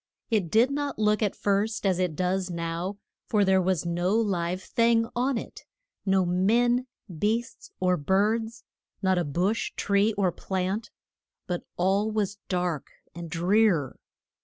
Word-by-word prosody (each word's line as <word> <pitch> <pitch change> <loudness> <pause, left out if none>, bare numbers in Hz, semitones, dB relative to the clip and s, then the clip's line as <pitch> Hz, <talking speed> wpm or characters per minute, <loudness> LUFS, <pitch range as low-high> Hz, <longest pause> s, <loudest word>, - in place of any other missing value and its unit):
It 205 -7 +1
did 230 - +4
not 285 0 -2
look 210 0 +2
at 210 -3 0
first 205 +2 0
as 185 -2 +2
it 180 -4 0
does 185 +1 0
now, 170 +3 -3 0.3
for 210 -2 +3
there 190 0 +4
was 180 -3 0
no 175 +4 0
live 185 -4 0
thing 230 -1 +2
on 250 +1 +1
it, - - -8 0.4
no 190 -1 +3
men, 235 +8 +2 0.3
beasts, 225 +5 -1
or 180 -1 +2
birds, 215 +8 0 0.4
not 190 -1 +3
a - - +1
bush, 175 +9 -1
tree 200 +2 +2
or 195 -3 +1
plant, 190 +5 -3 0.6
but 175 -1 -4
all 195 +4 +2
was 205 -2 -2
dark 180 -5 -1 0.3
and 170 0 -7
drear. 175 - +2
195 Hz, 145 wpm, -27 LUFS, 180-220 Hz, 0.6 s, did